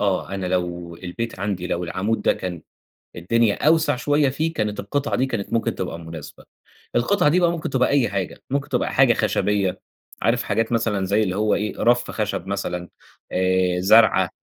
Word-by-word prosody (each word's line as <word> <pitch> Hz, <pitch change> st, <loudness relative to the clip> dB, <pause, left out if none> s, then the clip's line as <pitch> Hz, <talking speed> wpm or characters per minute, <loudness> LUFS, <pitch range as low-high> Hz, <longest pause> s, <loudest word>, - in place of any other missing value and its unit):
آه، 100 Hz, -3 st, 0 dB
أنا 95 Hz, -1 st, -3 dB
لو 90 Hz, -2 st, -2 dB
البيت 95 Hz, +6 st, -5 dB
عندي 95 Hz, -3 st, -2 dB
لو 90 Hz, -1 st, -2 dB
العمود 105 Hz, +6 st, -2 dB
ده -, -, +4 dB
كان 90 Hz, -4 st, -6 dB, 0.5 s
الدنيا 110 Hz, -, +1 dB
أوسع 160 Hz, -3 st, +4 dB
شويَّة 145 Hz, +2 st, +2 dB
فيه، 160 Hz, +5 st, -1 dB
كانت 105 Hz, -7 st, -2 dB
القطعة 140 Hz, +8 st, -2 dB
دي 130 Hz, -, +1 dB
كانت 115 Hz, -6 st, -4 dB
ممكن 115 Hz, -1 st, 0 dB
تبقى 85 Hz, -, -4 dB
مُناسبة، 80 Hz, -2 st, -10 dB, 0.5 s
القطعة 150 Hz, +5 st, +3 dB
دي 180 Hz, +4 st, +3 dB
بقى 170 Hz, -1 st, +4 dB
ممكن 170 Hz, -3 st, -3 dB
تبقى 125 Hz, -1 st, +2 dB
أي 140 Hz, -4 st, +2 dB
حاجة، 100 Hz, -2 st, -4 dB
ممكن 140 Hz, +1 st, -1 dB
تبقى 125 Hz, -, -1 dB
حاجة 130 Hz, -3 st, +5 dB
خشبيَّة، 105 Hz, -2 st, 0 dB, 0.4 s
عارف 115 Hz, +3 st, +2 dB
حاجات 115 Hz, +1 st, -1 dB
مثلًا 110 Hz, -4 st, 0 dB
زي 105 Hz, +3 st, +2 dB
اللي 95 Hz, -3 st, -1 dB
هو 105 Hz, +1 st, +2 dB
إيه 105 Hz, -1 st, -2 dB
رف 120 Hz, 0 st, +2 dB
خشب 105 Hz, -4 st, -3 dB
مثلًا، 90 Hz, -3 st, -3 dB, 0.4 s
آآ 95 Hz, -1 st, +1 dB
زرعة 105 Hz, +3 st, +5 dB
105 Hz, 180 wpm, -22 LUFS, 95-120 Hz, 0.5 s, حاجة